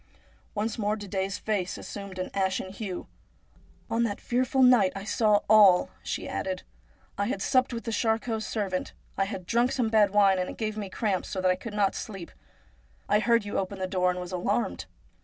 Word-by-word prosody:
Once 215 +2 -2
more 210 0 +1
Didet's 195 -1 -3
face 200 -4 -2
assumed 200 -2 -8
an 185 - -4
ashen 190 -1 -1
hue. 195 -2 -5 0.4
' - - -31
On 230 - +1
that 215 -4 -1
fearful 255 +2 +1
night 240 -7 +6
I 195 - -5
saw 210 0 +3
all,' 200 -4 +6
she - - -4
added. 185 -1 -3 0.3
' - - -34
I 200 - +1
had 210 - -2
supped 255 +5 +2
with 230 -1 -4
the 230 - -3
Charcots' 225 -1 0
servant. 195 -4 -2 0.2
I 195 - +1
had 190 -3 -6
drunk 240 +5 +2
some 245 -4 0
bad 215 -2 +4
wine, 195 -2 +4
and 180 - -2
it - - -8
gave 215 -1 -2
me 205 -3 -5
cramps, 195 -2 -1
so 190 - -3
that 185 0 +3
I - - +2
could 210 +3 -8
not 200 -2 +2
sleep. 195 -6 -7 0.8
I 210 +1 +3
heard 235 -1 +2
you 205 - -1
open 195 +1 -4
the 190 - -2
door, 185 -1 +1
and 180 0 -2
was 180 0 -6
alarmed. 115 - -1
205 Hz, 205 wpm, -27 LUFS, 185-220 Hz, 0.8 s, night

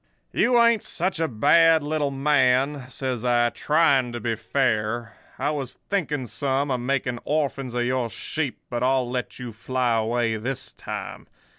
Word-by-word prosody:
"'You 240 0 +3
ain't 235 -2 +4
such 180 0 -2
a 165 - +1
bad 160 +7 +4
little 150 -1 0
man,' 135 -1 +2
says 130 -3 -3
I, 120 -1 +3
trying 140 -5 +2
to 120 - -4
be 115 +1 -1
fair. 115 -2 -1 0.2
'I 145 +3 0
was 135 -4 -4 0.2
thinking 150 -9 -1
some 135 +3 -1
of 125 - 0
making 125 -1 -1
orphans 140 -4 -1
of 120 0 +1
your 125 -1 0
sheep, 145 +4 -3
but 120 -1 -3
I'll 130 0 +2
let 125 0 -4
you 125 -2 -6
fly 125 +2 -1
away 115 0 0
this 125 +4 -5
time. - - -7
130 Hz, 160 wpm, -24 LUFS, 120-145 Hz, 0.2 s, ain't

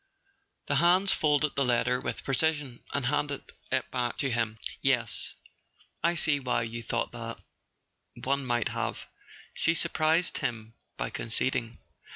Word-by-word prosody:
The 145 - +1
hands 180 +5 +5
folded 150 -1 +2
the 140 - +3
letter 125 0 +2
with - - -3
precision, 140 -2 +1
and 140 -3 -1
handed 145 +1 0 0.3
it 130 -2 0
back 120 -2 -1
to 135 -2 0
him. 115 -1 0 0.2
"Yes: 125 -5 +1 0.7
I 170 +1 +3
see 155 -3 +3
why 125 -3 0
you 115 +1 -5
thought 115 0 -1
that—one 120 +3 -6
might 120 -3 +1
have," - - -3 0.5
she 165 - +2
surprised 160 +2 +1
him 115 -2 -3 0.2
by - - -2
conceding. 115 0 -2
130 Hz, 135 wpm, -29 LUFS, 120-150 Hz, 0.7 s, hands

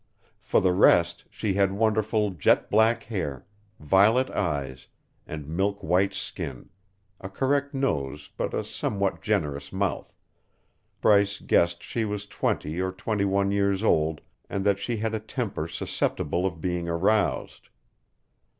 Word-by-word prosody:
For - - +1
the 95 -1 +3
rest, 85 -2 +4
she 105 -3 -2
had 100 0 +2
wonderful 110 0 +1
jet 85 -6 +2
black 110 +2 +3
hair, 75 - -4 0.3
violet 100 - +4
eyes, 70 -8 -3 0.4
and 75 -2 -6
milk 100 +5 -1
white 95 +4 +2
skin, 80 -9 -6 0.5
a 95 - -7
correct 140 +6 0
nose 70 - -2
but - - -2
a - - -1
somewhat 100 -1 -2
generous 75 -9 -1
mouth, 95 -1 -2 0.9
Bryce 100 -1 +4
guessed 85 0 +2
she 115 - -2
was 105 -1 -3
twenty 80 -4 -2
or 95 0 -1
twenty 100 +2 -1
one 100 0 +1
years 100 0 +1
old 80 -6 +2 0.3
and 100 0 -2
that 100 -1 +3
she 115 +3 -2
had 110 +1 -2
a 110 - -1
temper 110 - -4
susceptible 85 +1 -1
of 85 -3 -6
being 90 -1 -2
aroused. 95 +5 0
100 Hz, 140 wpm, -26 LUFS, 85-105 Hz, 0.9 s, rest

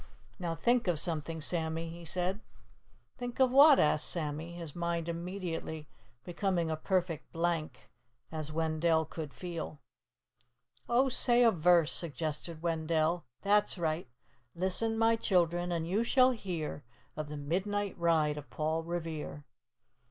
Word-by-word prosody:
"Now 170 -2 -2
think 240 +6 +2
of 170 -4 +1
something, 160 -1 -2
Sammy," 160 +1 -1
he 170 0 -9
said. 180 +4 -1 0.8
"Think 245 0 -5
of 260 -1 +5
what?" 280 +2 +8
asked 150 0 +3
Sammy, 160 0 -3
his 170 -4 -7
mind 170 -1 -2
immediately 170 -3 -4 0.4
becoming 175 -1 -1
a - - 0
perfect 175 -1 -1
blank, 165 -2 -2 0.4
as 155 -1 -4
Wendell 160 0 +1
could 155 -1 -6
feel. 170 -4 -6 1.1
"Oh, 250 +3 +4
say 245 -1 +4
a 230 - +6
verse," 170 -2 +4
suggested 160 +1 -3
Wendell. 160 0 0 0.2
"That's 205 0 +3
right: 160 -5 -2 0.5
'Listen, 190 +6 0
my 225 0 +4
children, 175 -3 +1
and 165 -1 -1
you 200 +6 +1
shall 255 +2 +5
hear 175 - -4 0.3
Of 155 -1 -4
the 150 0 -6
midnight 195 +7 -1
ride 155 -3 +2
of 145 - -13
Paul 160 +1 -1
Revere. 165 -3 -5
170 Hz, 135 wpm, -32 LUFS, 160-185 Hz, 1.1 s, what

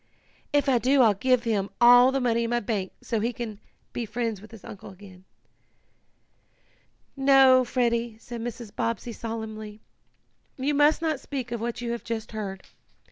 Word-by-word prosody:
"If 290 -1 +2
I 255 -3 +3
do 260 +2 +4
I'll 220 -3 +5
give 250 +4 +1
him 205 -4 -1
all 245 +2 +7
the 270 - 0
money 235 -2 +1
in - - -3
my 240 0 +1
bank 200 -4 -3
so 225 - -1
he 230 +3 0
can 220 -3 -6 0.3
be 240 - -3
friends 225 -2 -3
with 215 - -13
his 225 -3 -13
uncle 200 - -10
again." 190 -1 -15 1.9
"No, 270 -1 +6
Freddie," 235 -2 -1
said 235 +1 -8
Mrs. 235 -2 -7
Bobbsey 230 +1 -2
solemnly. 220 -2 -6 0.8
"You 275 +3 0
must 295 +3 +3
not 310 -4 0
speak 260 -3 -6
of 235 -2 -3
what 235 +1 -3
you 235 -1 -3
have 235 - -4
just 225 -1 -5
heard. 200 -3 -6
235 Hz, 170 wpm, -26 LUFS, 220-255 Hz, 1.9 s, all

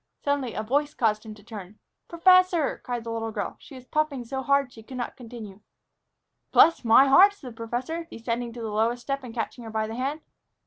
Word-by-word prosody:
Suddenly 285 -4 -1
a 215 - -2
voice 290 +6 0
caused 215 -2 0
him 215 - -8
to 205 - -17
turn. 210 -2 -10 0.3
"Professor!" 365 -2 +4
cried 245 -2 -4
the 230 - -5
little 225 0 -3
girl. - - -4
She 280 - -13
was 255 -1 -12
puffing 290 -3 -1
so 265 +3 -4
hard 280 +1 +3
that 250 - -22
she 225 - -12
could 255 +3 -9
not 245 - -4
continue. 225 -5 -10 0.9
"Bless 330 - +5
my 230 +4 +7
heart!" 380 +9 +7
said 265 -11 -10
the - - -15
professor, 250 +9 -4
descending 235 +1 -4
to 240 - -8
the 220 - -4
lowest 230 +3 0
step 275 -1 -3
and 245 - -8
catching 235 +1 -4
her 225 - -7
by 220 0 -1
the 220 - -6
hand. 275 +6 -3
245 Hz, 220 wpm, -26 LUFS, 225-280 Hz, 0.9 s, my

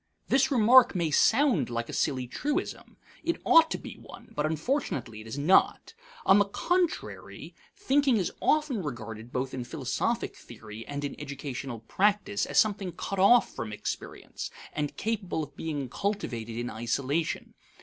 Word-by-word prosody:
This 270 0 +4
remark 245 -2 +6
may 170 -3 0
sound 225 - +3
like 115 0 -3
a - - -8
silly 130 -4 0
truism. 295 - -3 0.3
It 335 +1 -1
ought 325 -1 +7
to - - -2
be - - -9
one; - - -13
but 150 +1 +1
unfortunately 155 - -2
it 110 - -11
is 110 - -6
not. 170 - +3 0.3
On 195 - +7
the 205 - +4
contrary, 350 - -2 0.2
thinking 275 -3 +2
is 185 - -1
often 300 -8 +2
regarded 115 - -6
both 130 +1 -2
in 130 - -3
philosophic 120 - -2
theory 110 0 -10
and 145 0 -4
in 140 - -4
educational 135 -4 -6
practice 205 - +1
as - - -3
something 200 -4 +2
cut 195 +4 -4
off 235 +5 +5
from 110 - -5
experience, 105 - -6 0.2
and 150 -1 -3
capable 205 -7 -2
of 145 -1 -10
being 150 -5 -3
cultivated 120 - -3
in 120 +1 -3
isolation. 140 +8 -2
160 Hz, 155 wpm, -28 LUFS, -, 0.3 s, ought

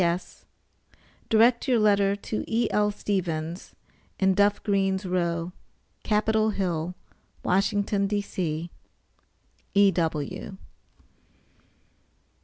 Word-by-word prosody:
P.S. 175 +1 -2 0.8
Direct 235 +4 +4
your 250 -2 +3
letter 200 -2 +3
to 210 +1 -4
E.L. 220 -2 +1
Stevens, 175 -5 -3 0.4
in 190 0 +3
Duff 205 +1 +2
Green's 195 -1 0
Row, 170 -1 -1 0.5
Capitol 220 0 +2
Hill, 180 -4 -2 0.5
Washington, 200 +1 +1
D.C. 175 -5 -3 1.0
E.W. 175 -3 +1
195 Hz, 75 wpm, -26 LUFS, 175-210 Hz, 1.0 s, Direct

